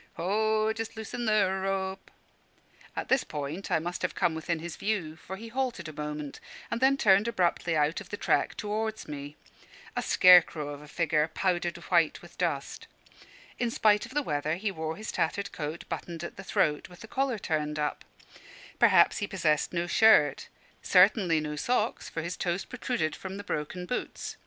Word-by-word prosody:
"Ho! 215 Hz, +4 st, +1 dB
just 225 Hz, 0 st, -6 dB
loosen 235 Hz, +2 st, -4 dB
the 215 Hz, -3 st, +4 dB, 0.2 s
rope" 195 Hz, 0 st, -2 dB, 0.9 s
At -, -, -3 dB
this 265 Hz, -1 st, +3 dB
point 150 Hz, +6 st, -5 dB
I -, -, +3 dB
must 175 Hz, +2 st, -4 dB
have 180 Hz, -, -2 dB
come 170 Hz, -, +1 dB
within 160 Hz, +1 st, -2 dB
his 165 Hz, +1 st, -6 dB
view, 190 Hz, -7 st, -2 dB
for 180 Hz, +4 st, -8 dB
he 225 Hz, +3 st, -9 dB
halted 245 Hz, -8 st, -2 dB
a 155 Hz, -, -8 dB
moment, 150 Hz, -1 st, -5 dB, 0.3 s
and 235 Hz, +1 st, -2 dB
then 270 Hz, +1 st, +4 dB
turned 200 Hz, -2 st, +4 dB
abruptly 175 Hz, -6 st, +1 dB
out 150 Hz, +5 st, +1 dB
of 190 Hz, -, -12 dB
the 205 Hz, -, -4 dB
track -, -, +1 dB
towards 215 Hz, +1 st, -3 dB
me, 145 Hz, 0 st, -7 dB, 0.6 s
a -, -, 0 dB
scare 180 Hz, -1 st, +8 dB
crow 150 Hz, -3 st, -6 dB
of 145 Hz, 0 st, -7 dB
a 150 Hz, -, -12 dB
figure, 155 Hz, -1 st, +1 dB
powdered 175 Hz, 0 st, 0 dB
white 170 Hz, -3 st, +1 dB
with 175 Hz, -, -15 dB
dust. 165 Hz, -6 st, -2 dB, 0.7 s
In 240 Hz, -, +1 dB
spite 215 Hz, -1 st, +3 dB
of 260 Hz, -, -14 dB
the 295 Hz, -, +2 dB
weather, 150 Hz, -, -1 dB
he 200 Hz, +3 st, -2 dB
wore 160 Hz, -3 st, -4 dB
his 215 Hz, +4 st, -6 dB
tattered 200 Hz, +5 st, -1 dB
coat 155 Hz, +2 st, -5 dB
buttoned 170 Hz, -1 st, -5 dB
at 170 Hz, -, -6 dB
the 195 Hz, -, -9 dB
throat, 150 Hz, -5 st, 0 dB
with 180 Hz, -, -14 dB
the 225 Hz, -, -9 dB
collar 265 Hz, -1 st, 0 dB
turned 150 Hz, -5 st, -2 dB
up. 150 Hz, -1 st, -2 dB, 0.8 s
Probably -, -, +6 dB
he 205 Hz, -, -2 dB
possessed 160 Hz, -7 st, +1 dB
no 170 Hz, 0 st, -1 dB
shirt; 170 Hz, -6 st, +4 dB, 0.3 s
certainly 180 Hz, -3 st, +4 dB
no 150 Hz, 0 st, -4 dB
socks, 230 Hz, +7 st, -1 dB
for 165 Hz, -, -4 dB
his 175 Hz, +2 st, -4 dB
toes 175 Hz, +1 st, -1 dB
protruded 245 Hz, -, -2 dB
from 190 Hz, 0 st, -7 dB
the 205 Hz, -, -6 dB
broken 180 Hz, +1 st, -4 dB
boots. 250 Hz, -, -4 dB
180 Hz, 185 wpm, -29 LUFS, 155-215 Hz, 0.9 s, scare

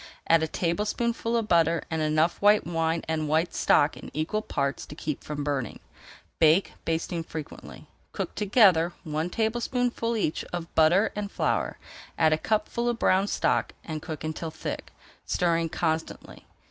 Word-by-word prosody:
Add 165 Hz, 0 st, +5 dB
a 160 Hz, -, 0 dB
tablespoonful 215 Hz, +8 st, -1 dB
of 225 Hz, -2 st, -1 dB
butter 170 Hz, -2 st, +3 dB
and 160 Hz, -1 st, -1 dB
enough 155 Hz, +2 st, +1 dB
white 205 Hz, +1 st, +5 dB
wine 165 Hz, -1 st, -1 dB
and 155 Hz, -1 st, -1 dB
white 160 Hz, +3 st, +1 dB
stock 145 Hz, +1 st, +3 dB
in -, -, -10 dB
equal 160 Hz, +8 st, -1 dB
parts 140 Hz, -9 st, -2 dB
to 150 Hz, -, -9 dB
keep 150 Hz, -2 st, -4 dB
from 145 Hz, -1 st, -4 dB
burning. 140 Hz, -5 st, -2 dB, 0.6 s
Bake, 160 Hz, +4 st, +4 dB
basting 165 Hz, +1 st, -1 dB
frequently. 160 Hz, -2 st, -9 dB, 0.3 s
Cook -, -, -4 dB
together 190 Hz, -5 st, +4 dB
one 155 Hz, +1 st, -2 dB
tablespoonful 235 Hz, +2 st, -1 dB
each 170 Hz, -6 st, -1 dB
of 175 Hz, -1 st, -6 dB
butter 175 Hz, +7 st, +4 dB
and 205 Hz, -1 st, -4 dB
flour, -, -, -1 dB, 0.4 s
add 160 Hz, -1 st, +4 dB
a 155 Hz, -, 0 dB
cupful 235 Hz, +4 st, 0 dB
of 240 Hz, -, -1 dB
brown 190 Hz, -2 st, +3 dB
stock -, -, 0 dB
and 155 Hz, -2 st, -5 dB
cook 155 Hz, -2 st, -6 dB
until 155 Hz, +1 st, -4 dB
thick, -, -, -6 dB, 0.4 s
stirring 165 Hz, -2 st, +1 dB
constantly. 160 Hz, 0 st, -3 dB
165 Hz, 155 wpm, -27 LUFS, 155-205 Hz, 0.6 s, Add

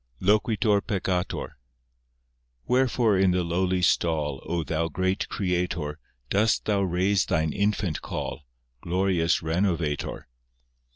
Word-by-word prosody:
I -, -, -8 dB
(Loquitur 105 Hz, 0 st, +3 dB
peccator) 95 Hz, -3 st, -2 dB, 1.2 s
Wherefore 125 Hz, -5 st, +2 dB
in 95 Hz, -1 st, +4 dB
the 90 Hz, 0 st, +1 dB
lowly 90 Hz, +2 st, 0 dB
stall, 75 Hz, -5 st, +1 dB
O 85 Hz, -2 st, -1 dB
Thou 80 Hz, +1 st, -1 dB
great 95 Hz, +3 st, -1 dB
Creator, 90 Hz, -5 st, -2 dB, 0.3 s
Dost 110 Hz, +3 st, +2 dB
Thou 100 Hz, -2 st, +1 dB
raise 95 Hz, +1 st, +2 dB
Thine 80 Hz, -2 st, 0 dB
infant 100 Hz, -5 st, 0 dB
call, -, -, -5 dB, 0.4 s
Glorious 90 Hz, -2 st, +1 dB
Renovator? 80 Hz, -3 st, -1 dB
90 Hz, 110 wpm, -26 LUFS, 85-100 Hz, 1.2 s, in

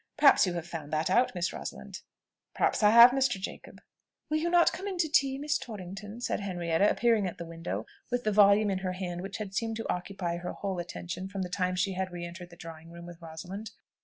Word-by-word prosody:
Perhaps 290 Hz, -9 st, +6 dB
you 180 Hz, -, -1 dB
have 170 Hz, -1 st, -4 dB
found 160 Hz, -4 st, -7 dB
that 155 Hz, +3 st, 0 dB
out, 245 Hz, +1 st, +3 dB
Miss 170 Hz, -1 st, -1 dB
Rosalind?" -, -, -7 dB, 0.5 s
"Perhaps -, -, +1 dB
I 210 Hz, -, +6 dB
have, 235 Hz, +3 st, +10 dB
Mr. 260 Hz, -6 st, +1 dB
Jacob." 190 Hz, -, -8 dB, 0.5 s
"Will 310 Hz, -, +3 dB
you 330 Hz, +2 st, 0 dB
not 345 Hz, -1 st, +5 dB
come 375 Hz, +5 st, -5 dB
in 385 Hz, -2 st, -3 dB
to 340 Hz, -2 st, +2 dB
tea, 275 Hz, -3 st, +2 dB
Miss 295 Hz, +2 st, 0 dB
Torrington?" 205 Hz, 0 st, -8 dB
said -, -, -1 dB
Henrietta, 175 Hz, -1 st, +1 dB
appearing 225 Hz, -5 st, +2 dB
at 175 Hz, -, -6 dB
the 170 Hz, -, -6 dB
window, 165 Hz, +1 st, -5 dB, 0.2 s
with 245 Hz, 0 st, -1 dB
the 215 Hz, -, +1 dB
volume 205 Hz, 0 st, +5 dB
in 190 Hz, -, -1 dB
her 185 Hz, -1 st, -2 dB
hand 180 Hz, -1 st, -4 dB
which 195 Hz, +1 st, -5 dB
had 205 Hz, -3 st, -6 dB
seemed 225 Hz, +2 st, -1 dB
to 225 Hz, -, -2 dB
occupy 180 Hz, -1 st, -4 dB
her 175 Hz, +1 st, -5 dB
whole 195 Hz, -3 st, -3 dB
attention 175 Hz, +1 st, -5 dB
from 195 Hz, -1 st, -3 dB
the 180 Hz, -, -5 dB
time 180 Hz, 0 st, -1 dB
she 190 Hz, +1 st, 0 dB
had 190 Hz, 0 st, -2 dB
re 175 Hz, -1 st, -5 dB
entered 175 Hz, +1 st, -9 dB
the 170 Hz, -, -14 dB
drawing 165 Hz, -1 st, -10 dB
room 170 Hz, 0 st, -10 dB
with 175 Hz, 0 st, -11 dB
Rosalind. 180 Hz, +6 st, -7 dB
190 Hz, 230 wpm, -29 LUFS, 175-225 Hz, 0.5 s, have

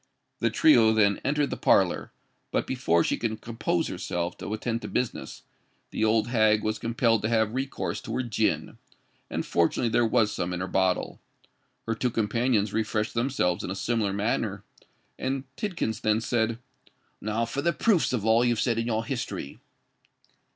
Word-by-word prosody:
The -, -, +2 dB
trio 115 Hz, -, +5 dB
then 100 Hz, -2 st, +3 dB
entered 145 Hz, +1 st, +1 dB
the -, -, -3 dB
parlour: -, -, +2 dB, 0.4 s
but -, -, 0 dB
before 85 Hz, -11 st, +1 dB
she -, -, 0 dB
could 110 Hz, -2 st, -2 dB
compose 115 Hz, -1 st, -1 dB
herself 85 Hz, 0 st, -3 dB
to -, -, -6 dB
attend 115 Hz, +2 st, -2 dB
to -, -, -6 dB
business, 125 Hz, -, -3 dB, 0.5 s
the -, -, -1 dB
old 110 Hz, +1 st, +2 dB
hag 110 Hz, -3 st, +3 dB
was 110 Hz, 0 st, -1 dB
compelled 115 Hz, -1 st, +1 dB
to 110 Hz, -, -1 dB
have 110 Hz, -2 st, +2 dB
recourse 135 Hz, +1 st, -3 dB
to -, -, -5 dB
her 130 Hz, -, 0 dB
gin; 110 Hz, -2 st, -1 dB, 0.5 s
and -, -, -3 dB
fortunately 85 Hz, +7 st, +1 dB
there 120 Hz, -, +3 dB
was 110 Hz, -2 st, +2 dB
some 90 Hz, +1 st, -2 dB
in 90 Hz, -, -3 dB
her 90 Hz, -, -2 dB
bottle. 95 Hz, -1 st, 0 dB, 0.6 s
Her 115 Hz, -, 0 dB
two 125 Hz, +3 st, 0 dB
companions 110 Hz, -1 st, 0 dB
refreshed 110 Hz, 0 st, -1 dB
themselves 115 Hz, -8 st, 0 dB
in -, -, -4 dB
a 95 Hz, -, -3 dB
similar 110 Hz, -1 st, 0 dB
manner; 100 Hz, -1 st, -1 dB, 0.6 s
and 135 Hz, 0 st, -2 dB
Tidkins 175 Hz, -, -3 dB
then 110 Hz, 0 st, +2 dB
said, 115 Hz, -1 st, 0 dB, 0.6 s
"Now 110 Hz, +2 st, -1 dB
for 135 Hz, +4 st, -3 dB
the 170 Hz, +3 st, +2 dB
proofs 190 Hz, +1 st, +2 dB
of 115 Hz, -5 st, -1 dB
all 110 Hz, +2 st, +4 dB
you've 120 Hz, -2 st, +1 dB
said 115 Hz, 0 st, +1 dB
in 115 Hz, -, -2 dB
your 115 Hz, -1 st, -1 dB
history." 120 Hz, -, -4 dB
110 Hz, 170 wpm, -27 LUFS, 105-120 Hz, 0.6 s, trio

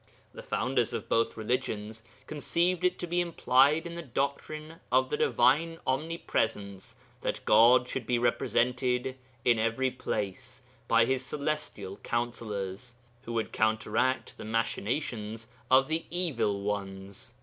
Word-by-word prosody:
The -, -, -8 dB
founders 125 Hz, -3 st, 0 dB
of 115 Hz, -3 st, -4 dB
both 115 Hz, 0 st, +1 dB
religions 110 Hz, -2 st, -2 dB, 0.2 s
conceived 170 Hz, +4 st, 0 dB
it 180 Hz, 0 st, +2 dB
to -, -, -4 dB
be 175 Hz, +1 st, +1 dB
implied 155 Hz, -2 st, +3 dB
in 170 Hz, -, -6 dB
the 170 Hz, -, -5 dB
doctrine 155 Hz, +3 st, -3 dB
of 130 Hz, +1 st, +3 dB
the -, -, +1 dB
Divine 165 Hz, +4 st, +3 dB
Omnipresence 115 Hz, -, -2 dB, 0.3 s
that -, -, -3 dB
God 120 Hz, +4 st, +6 dB
should 125 Hz, -3 st, -4 dB
be 125 Hz, -, +2 dB
represented 125 Hz, +2 st, +1 dB, 0.3 s
in 120 Hz, -2 st, +4 dB
every 115 Hz, +4 st, +1 dB
place 125 Hz, +2 st, -4 dB, 0.2 s
by 115 Hz, 0 st, +5 dB
His 130 Hz, +1 st, 0 dB
celestial 145 Hz, -8 st, -3 dB
councillors, 115 Hz, -2 st, -3 dB, 0.3 s
who 115 Hz, -, -5 dB
would 115 Hz, -1 st, -1 dB
counteract 110 Hz, +4 st, 0 dB
the -, -, -6 dB
machinations 115 Hz, 0 st, -2 dB, 0.2 s
of 135 Hz, +1 st, +6 dB
the 160 Hz, +1 st, -1 dB
Evil 130 Hz, -, 0 dB
Ones. 100 Hz, +1 st, -4 dB
125 Hz, 130 wpm, -29 LUFS, 110-140 Hz, 0.3 s, God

